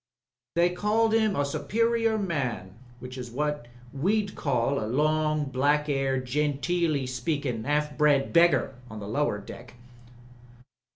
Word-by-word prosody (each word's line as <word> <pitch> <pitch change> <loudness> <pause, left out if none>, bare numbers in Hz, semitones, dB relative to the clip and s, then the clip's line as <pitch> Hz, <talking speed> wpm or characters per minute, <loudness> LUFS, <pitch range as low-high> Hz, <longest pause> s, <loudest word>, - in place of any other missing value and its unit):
They 175 +1 +3
called 215 +4 +1
'im 220 -3 +2
a 145 - +1
superior 230 +8 0
man 130 - -3 0.2
which 125 +1 -8
is 125 -1 -6
what 150 0 -2 0.3
we'd 200 +8 0
call 135 -2 0
a - - -3
long, 155 +3 +1
black 145 +3 +1
'aired, 135 -2 0
genteely 150 +2 0
speakin', 125 -2 -3
'alf 150 0 0
bred 145 -2 +3
beggar 170 -4 +4 0.2
on 110 -1 -8
the 100 - -7
lower 125 0 0
deck." 115 +4 -11
145 Hz, 130 wpm, -27 LUFS, 130-170 Hz, 0.3 s, beggar